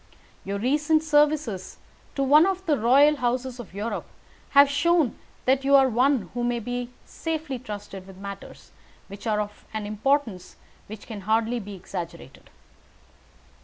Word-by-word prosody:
Your 200 +1 -3
recent 295 +7 +2
services 295 - +1 0.4
to 275 - 0
one 300 +6 +6
of 380 -1 -2
the 305 - +3
royal 280 +5 +5
houses 250 0 -2
of 235 - -9
Europe 215 +3 -4 0.5
have 280 0 +9
shown 295 0 +2 0.3
that 265 +1 +2
you 280 +1 +4
are 270 -1 +6
one 245 -4 +1
who 240 0 -2
may 245 0 -2 0.2
safely 315 -5 -4
be - - -20
trusted 205 -4 -8
with 190 -1 -13
matters 200 0 -10 0.4
which 200 +3 -8
are 210 -1 +1
of 210 0 -5
an 215 -1 -3
importance 215 -3 -1 0.3
which 210 0 -10
can 215 -4 -7
hardly 225 +4 +1
be 205 -2 -8
exaggerated. 170 -5 -8
245 Hz, 150 wpm, -25 LUFS, 205-285 Hz, 0.5 s, have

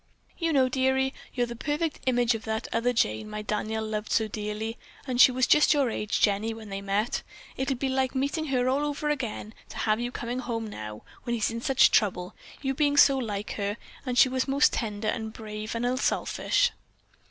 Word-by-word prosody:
"You 330 -1 +1
know, 265 -4 +4
dearie, 265 +1 +1 0.2
you're 245 -1 0
the 235 0 -7
perfect 295 +5 -2
image 245 -1 +3
of 225 -1 -5
that 220 0 -2
other 230 +2 +2
Jane 110 - 0
my 210 0 -5
Daniel 215 +1 -2
loved 215 -1 -4
so 220 - +2
dearly, 215 +2 -4 0.3
and 250 -2 +2
she 260 - +9
was 255 0 +2
just 300 0 +5
your 275 -5 +2
age, 210 -1 -2
Jenny, 215 +2 +2
when 220 -2 -10
they 195 0 -4
met. 200 +3 -1 0.3
It'll 270 0 -1
be 265 +2 -2
like 265 0 0
meeting 280 +4 0
her 255 -3 +1
all 270 +3 +1
over 295 0 -2
again 240 -6 -3 0.2
to - - -9
have 215 0 +1
you 240 0 -2
coming 240 +1 -4
home 230 -3 -3
now, 105 - -7 0.2
when 240 -1 -2
he's 225 -1 0
in 230 0 -4
such 270 +1 +4
trouble, 185 -4 +1 0.3
you 270 0 0
being 285 +1 +1
so 275 -1 +7
like 210 -4 -4
her, 205 +1 -2 0.3
and 250 -2 -3
she 260 - +8
was 260 +1 -1
most 275 +2 +3
tender 215 -1 -2
and 220 0 -2
brave 215 0 -6
and 230 +1 -1
unselfish." 255 - +1
240 Hz, 205 wpm, -27 LUFS, 215-265 Hz, 0.3 s, she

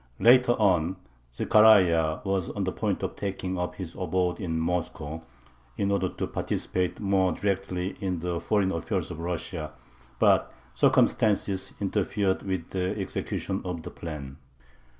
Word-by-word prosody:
Later 125 +1 +6
on 95 -5 +2 0.4
Zechariah 85 - +5
was 95 -3 -1
on - - -3
the - - -1
point - - -2
of - - -3
taking 95 -2 -3
up 90 0 -3
his 90 -3 -6
abode 90 -1 -1
in 80 -4 -2
Moscow 80 -2 -2 0.6
in 100 0 0
order 95 -2 +1
to - - -4
participate 90 -1 -2
more 95 -2 +2
directly 95 -1 -2
in 95 -2 -2
the 85 0 -2
foreign 100 -1 +1
affairs 85 -3 -2
of 80 - -7
Russia, 85 -2 -4 0.4
but - - +3 0.2
circumstances 100 - +2
interfered 100 -1 0
with 95 -4 -4
the 95 +2 -1
execution 95 0 -3
of 90 -3 -4
the - - -7
plan. 75 -4 -7
90 Hz, 140 wpm, -27 LUFS, 85-100 Hz, 0.6 s, Later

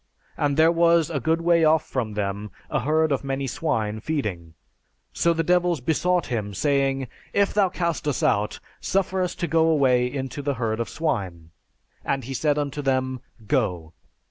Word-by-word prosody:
And 145 -1 0
there 160 +1 +6
was 170 -1 +3
a 145 - -1
good 160 +6 +1
way 170 -1 +3
off 155 0 +4
from 115 -5 -3
them 100 0 -3 0.2
a 150 - +1
herd 155 +4 +1
of 140 - 0
many 135 0 -2
swine 115 -7 -2
feeding. 105 - -4 0.6
So 170 - +2
the 165 0 0
devils 175 -1 +2
besought 170 +6 +1
him, 105 -5 -3
saying, 135 0 +1 0.3
'If 200 0 +2
thou 200 -2 +3
cast 170 -3 -2
us 145 +2 -1
out, 110 -8 +1 0.2
suffer 190 0 0
us 180 - -1
to - - -2
go 165 -1 +3
away 125 -5 +3
into 135 +1 -4
the 140 -1 -1
herd 115 -2 -2
of 115 - -2
swine. 95 - -3 0.5
And 135 -1 -1
he 135 +3 -6
said 145 +2 +1
unto 145 0 -2
them, 130 -2 -1 0.2
'Go!' 90 - -1
140 Hz, 175 wpm, -24 LUFS, 120-165 Hz, 0.6 s, there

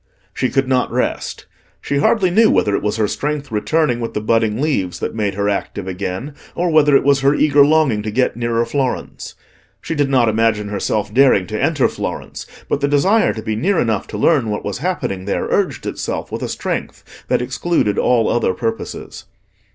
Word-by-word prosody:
She 130 - -1
could 135 +1 0
not 130 -1 +1
rest. - - -2 0.3
She 140 - -2
hardly 185 +4 +2
knew 220 +4 +5
whether 105 -1 +2
it - - -1
was 105 0 -1
her 110 -1 +1
strength 145 +4 -3
returning 120 +4 +1
with 115 -1 -5
the - - +1
budding 110 0 +1
leaves 135 - -1
that - - -3
made 105 -3 -2
her 100 0 -1
active 100 -1 -3
again, 95 +8 -4 0.2
or 175 0 0
whether 150 -2 +5
it - - +4
was 140 -1 +3
her 140 +2 +3
eager 145 -1 +5
longing 145 -7 +3
to 110 - -4
get 125 +4 0
nearer 120 0 0
Florence. 130 +1 -3 0.4
She - - -4
did 145 -3 0
not 130 -4 +3
imagine 110 -1 +1
herself 105 +1 -2
daring 130 -8 +4
to 110 +4 -4
enter 150 -3 +2
Florence, - - -6 0.2
but 140 - -1
the 140 - +2
desire 185 +10 +3
to 110 - -7
be 110 -1 -2
near 180 - +1
enough 110 -4 0
to 105 - -6
learn 130 -1 +2
what 105 - -3
was 100 +2 -3
happening 130 - -3
there 100 - -1
urged - - 0
itself - - -4
with - - -4
a - - -3
strength - - -5
that - - +1
excluded 165 -12 0
all 120 -3 +2
other 115 -6 +1
purposes. 115 +2 -5
120 Hz, 200 wpm, -18 LUFS, 105-145 Hz, 0.4 s, knew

